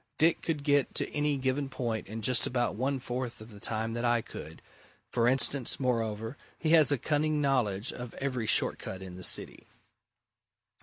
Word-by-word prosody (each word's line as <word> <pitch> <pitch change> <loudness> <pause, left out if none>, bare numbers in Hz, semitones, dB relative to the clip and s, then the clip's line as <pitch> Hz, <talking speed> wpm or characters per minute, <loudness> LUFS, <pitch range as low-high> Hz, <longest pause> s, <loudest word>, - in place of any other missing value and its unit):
Dick 165 +2 +3
could 155 -4 -2
get 145 -2 +2
to - - -1
any 150 -1 +1
given 135 +1 -1
point 115 -4 -3
in 110 +1 -6
just 125 +2 +3
about 120 -1 0
one 135 +5 0
fourth 125 -1 -4
of 110 +1 -12
the 105 - -12
time 115 +2 -2
that 120 +1 -3
I 120 -1 +2
could, - - -10 0.5
for 120 -1 +2
instance 130 0 +2
moreover, 115 -2 -1 0.2
he 160 - 0
has 155 -4 +7
a 145 - +3
cunning 150 +3 +1
knowledge 125 -7 +1
of 125 -1 -8
every 130 -5 -2
short - - +2
cut 95 0 -7
in 90 -1 -8
the 90 - -9
city." - - 0
125 Hz, 185 wpm, -30 LUFS, 115-140 Hz, 0.5 s, has